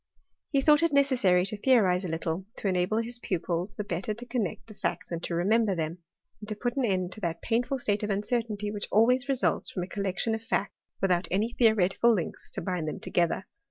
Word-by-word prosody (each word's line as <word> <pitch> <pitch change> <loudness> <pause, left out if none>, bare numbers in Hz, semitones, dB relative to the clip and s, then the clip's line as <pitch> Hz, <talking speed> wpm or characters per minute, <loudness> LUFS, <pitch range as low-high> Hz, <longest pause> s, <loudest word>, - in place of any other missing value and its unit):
He 275 -3 +2
thought 300 +2 +5
it 335 - +3
'Miceasary 245 -11 +3
to 215 - -4
theonze 205 -6 +3
a - - -2
little, 165 +2 -2
to - - -3
enable 185 +3 +1
his 235 +1 -3
pupils 180 -1 -2
the 210 - -3
6tter 200 +3 -3
to 245 - -7
connect 240 -7 -2
the 220 - -12
facts 200 - -3
and 170 -1 -3
to 170 - -3
remember 205 +3 +2
them; 165 +1 -3 0.5
^ - - -18
to 215 - 0
put 240 +3 -2
an 270 -3 +1
end 185 -4 0
to 215 - -8
that 170 -2 -3
painful 245 +4 0
state 210 -5 0
of 210 - -2
uncertainty 210 0 -1
^hich 205 -1 -4
always 250 +4 +4
Jesuits 270 -2 +1
from 180 - -3
a - - -5
collection 200 +3 -1
of 220 - -2
facts 205 -3 -1 0.3
without 185 -2 +2
^y 215 +6 -1
theoretical 220 0 +4
links 190 -7 -2
to - - -5
bind 180 -5 -2
them - - -4
together. 175 +2 0
205 Hz, 215 wpm, -28 LUFS, 180-235 Hz, 0.5 s, thought